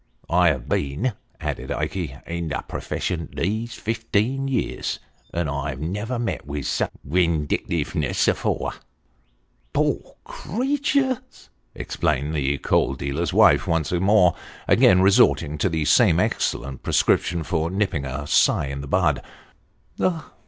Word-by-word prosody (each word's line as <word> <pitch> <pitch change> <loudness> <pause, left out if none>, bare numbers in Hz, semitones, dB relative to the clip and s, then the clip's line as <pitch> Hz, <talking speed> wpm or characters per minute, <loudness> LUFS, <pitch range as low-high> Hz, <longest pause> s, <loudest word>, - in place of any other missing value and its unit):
I 90 +1 +5
have 65 -7 0
been," 75 - -1 0.3
added - - -4
Ikey, 80 -8 -3
" - - -32
in 85 0 -4
the 75 - -3
purfession 85 -3 -3
these 110 +5 -2
fifteen 115 +4 -1
year, 130 -3 -2 0.5
and 85 -2 -1
I 70 -1 -3
never 105 - -3
met 115 -1 -2
vith 75 -1 -4
such - - 0 0.2
windictiveness 85 -1 0
afore! - - 0 0.4
" - - -41
" - - -42
Poor - - 0
creeturs! 260 - -2
" - - -42
exclaimed 75 +4 -1
the 70 -2 0
coal 70 - +1
dealer's 70 +6 -2
wife - - +5
once 80 -3 0
more: 90 0 +4 0.3
again 90 +1 +5
resorting 75 -6 +4
to 95 - +2
the 80 -2 -1
same - - +5
excellent 70 -1 -1
prescription 85 -1 +1
for 80 -1 -1
nipping 95 -6 -1
a 70 +2 -4
sigh 75 -1 +3
in 70 0 -4
the 70 - -7
bud. - - +2
85 Hz, 135 wpm, -23 LUFS, 70-105 Hz, 0.5 s, I